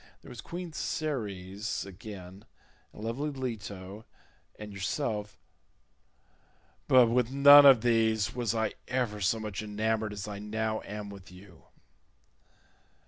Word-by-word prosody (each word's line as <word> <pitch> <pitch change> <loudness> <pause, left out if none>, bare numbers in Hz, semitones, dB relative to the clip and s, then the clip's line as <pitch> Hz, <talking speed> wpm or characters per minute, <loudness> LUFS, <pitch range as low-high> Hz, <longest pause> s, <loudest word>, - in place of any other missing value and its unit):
There - - -13
was 120 - -9
queen 175 -1 -7
Ceres 105 -12 -3
again, 100 0 -10 0.5
and 105 - -11
lovely 125 +7 -2
Leto, 105 -6 -6 0.5
and 105 -1 -9
yourself—but 105 +1 -3 1.7
with 120 0 +1
none 145 +1 +9
of 130 -5 +7
these 110 -2 +2
was 120 -2 -1
I 110 -1 0
ever 120 -5 -2
so 110 +4 +1
much 105 -2 -5
enamoured 110 0 -2
as 105 0 -6
I 100 -1 -6
now 110 +1 -2
am 105 0 -7
with 95 -2 -12
you." 90 -2 -16
110 Hz, 120 wpm, -29 LUFS, 100-120 Hz, 1.7 s, none